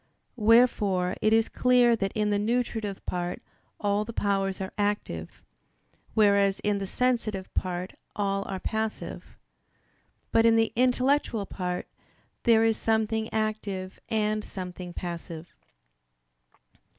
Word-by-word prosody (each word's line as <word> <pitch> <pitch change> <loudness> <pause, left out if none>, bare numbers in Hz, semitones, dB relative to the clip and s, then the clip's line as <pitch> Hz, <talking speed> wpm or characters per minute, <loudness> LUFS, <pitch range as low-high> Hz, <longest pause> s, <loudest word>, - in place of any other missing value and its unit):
Wherefore 210 -5 +4
it 215 - +3
is 225 0 +4
clear 250 -2 +4
that 195 -3 -2
in 210 -2 0
the 205 - +2
nutritive 220 -2 -1
part 175 0 -3 0.4
all 205 0 +1
the 230 +2 -7
powers 195 -2 0
are 190 -1 -5
active, 205 - -3 0.7
whereas 200 -2 +4
in 210 -1 +1
the 195 - -4
sensitive 230 -5 -1
part 180 0 -3 0.2
all 195 -1 0
are 190 -1 -4
passive: 220 +2 -4 0.9
but 225 - +4
in 230 0 +5
the 225 0 +2
intellectual 250 -2 +2
part, 180 -2 -3 0.6
there 225 -2 +6
is 225 -1 +2
something 220 0 0
active 210 -4 -3
and 215 -1 0
something 180 -2 -7
passive. 170 -1 -7
210 Hz, 120 wpm, -27 LUFS, 190-225 Hz, 0.9 s, there